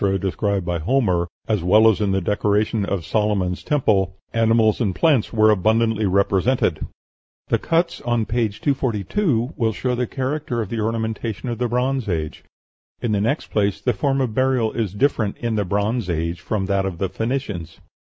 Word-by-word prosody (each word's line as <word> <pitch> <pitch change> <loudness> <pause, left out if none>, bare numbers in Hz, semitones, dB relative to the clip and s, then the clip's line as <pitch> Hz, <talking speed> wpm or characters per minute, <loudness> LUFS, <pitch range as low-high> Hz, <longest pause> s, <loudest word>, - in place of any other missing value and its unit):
described 100 0 -1
by 85 -1 -1
Homer, 90 - +1 0.2
as 105 -6 0
well 105 +5 +5
as 110 -3 +3
in 100 -2 +1
the 95 0 +1
decoration 105 +2 +1
of 95 -5 -3
Solomon's 100 -3 0
Temple, 100 - +1 0.2
animals 115 -1 +3
and 100 -6 0
plants 145 -9 +2
were 110 -1 +4
abundantly 110 +1 +2
represented." 100 +6 +1 0.6
The - - +2
cuts 170 +1 0
on 120 -2 0
p. 115 0 0
242 130 - -1
will 115 -5 0
show 125 +3 -2
the 125 0 -1
character 135 -2 -3
of 110 -4 -3
the 115 - -3
ornamentation 110 +1 -2
of 120 - -4
the 125 - +1
Bronze 125 -1 -1
Age. 80 -3 -3 0.6
In 120 - -2
the 100 -1 +1
next 140 +9 -1
place, 100 -2 +1
the 125 - 0
form 135 +6 0
of 125 -4 -1
burial 130 -3 +1
is 105 -5 -3
different 110 -3 +1
in 115 -1 -2
the 105 -2 0
Bronze 105 +3 -1
Age 85 +1 -2
from 105 -3 -2
that 95 0 0
of 90 -3 -5
the 95 - -1
Phoenicians. 105 - -4
110 Hz, 175 wpm, -21 LUFS, 100-120 Hz, 0.6 s, well